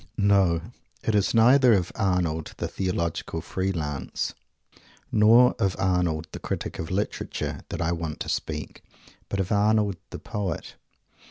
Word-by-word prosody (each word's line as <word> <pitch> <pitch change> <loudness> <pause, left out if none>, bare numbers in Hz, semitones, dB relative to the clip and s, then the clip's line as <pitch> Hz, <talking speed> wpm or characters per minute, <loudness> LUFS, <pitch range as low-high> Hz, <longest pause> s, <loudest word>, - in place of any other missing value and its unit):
No, 95 -4 +3 0.4
it 110 - 0
is 105 +2 +2
neither 125 +2 +6
of 90 -4 +1
Arnold, 90 -5 -1
the - - -2
Theological 85 -3 -2
Free 95 +1 -2
Lance, 75 -7 -3 0.8
or 115 +3 +6
of 95 -2 +1
Arnold, 90 -4 0
the - - -7
Critic - - -4
of 80 - -4
Literature, 100 +3 -3
that - - -2
I 80 - +1
want 80 -3 -3
to - - -3
speak, 75 -2 -4 0.5
but 100 - -2
of 95 +1 -1
Arnold, 105 -2 +2
the - - -6
Poet. 95 -6 -4
95 Hz, 145 wpm, -26 LUFS, 85-105 Hz, 0.8 s, neither